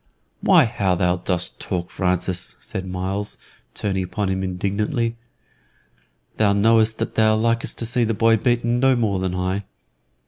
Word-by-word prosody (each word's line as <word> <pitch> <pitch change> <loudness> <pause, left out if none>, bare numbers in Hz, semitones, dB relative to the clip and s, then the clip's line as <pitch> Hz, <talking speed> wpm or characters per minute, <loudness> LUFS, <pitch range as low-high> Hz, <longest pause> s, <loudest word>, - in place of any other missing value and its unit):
"Why, - - +5
how 100 -5 0
dost 90 0 0 0.3
thou - - -6
talk, 90 -2 -2
Francis!" 90 -1 -1
said 95 0 -6
Myles, 95 +3 -3 0.4
turning 95 -2 -1
upon 95 +2 -2
him 95 0 -1
indignantly. 100 +6 -1 1.2
"Thou 105 -2 +3
knowest 110 +2 +3
that - - -3
thou 110 -1 +3
likest 115 +1 0
to 115 - -3
see 120 +1 +1
the 115 -1 0
boy 115 +1 +4
beaten 120 +1 +1
no 135 0 +4
more 105 -5 0
than 95 -1 -2
I." 95 +2 -1
100 Hz, 150 wpm, -22 LUFS, 95-115 Hz, 1.2 s, Why